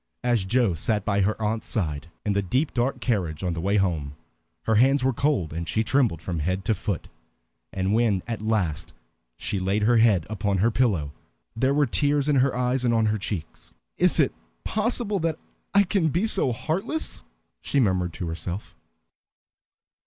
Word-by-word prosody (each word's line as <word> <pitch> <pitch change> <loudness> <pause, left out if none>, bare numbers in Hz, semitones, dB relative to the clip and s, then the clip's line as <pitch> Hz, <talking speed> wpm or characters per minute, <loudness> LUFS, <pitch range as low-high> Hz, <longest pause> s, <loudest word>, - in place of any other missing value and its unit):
As 120 -5 +1
Joe 115 -1 +2
sat 105 +6 -1
by 100 -1 +1
her 105 +3 0
aunt's 110 +1 -2
side 80 - -2 0.2
in 105 - +1
the 100 - +1
deep 130 - 0
dark 125 +2 0
carriage 90 - -1
on 90 -2 0
the 85 - -4
way 100 +4 +1
home, 80 -7 -1 0.5
her 110 - +1
hands 130 +5 +4
were 130 0 +2
cold 120 - 0
and 85 +1 -4
she 110 - +1
trembled 110 - +1
from 85 -3 -3
head 90 +5 -2
to 110 - +2
foot. 100 -2 -3 0.6
And 95 +1 -1
when 110 -5 +2
at 115 -3 -4
last 95 -8 -1 0.4
she 100 - -2
laid 95 +3 0
her 120 +2 +4
head 105 -7 +4
upon 100 -2 -1
her 110 +6 +3
pillow 100 - +1 0.4
there 130 +4 +1
were 145 0 +4
tears 145 +3 +1
in 145 -2 +3
her 130 0 +2
eyes 125 +1 0
and 120 -1 +2
on 110 -1 +3
her 110 - -2
cheeks. 95 -5 -6 0.2
"Is - - +3
it - - +3 0.3
possible 215 -2 0
that 165 -2 -1 0.3
I 200 0 +5
can 185 -4 +1
be 175 +8 +1
so 190 - +2
heartless?" 190 - -2 0.4
she 140 - 0
murmured 95 -7 +1
to 90 -2 -5
herself. 85 +4 -5
110 Hz, 180 wpm, -25 LUFS, 95-130 Hz, 0.6 s, I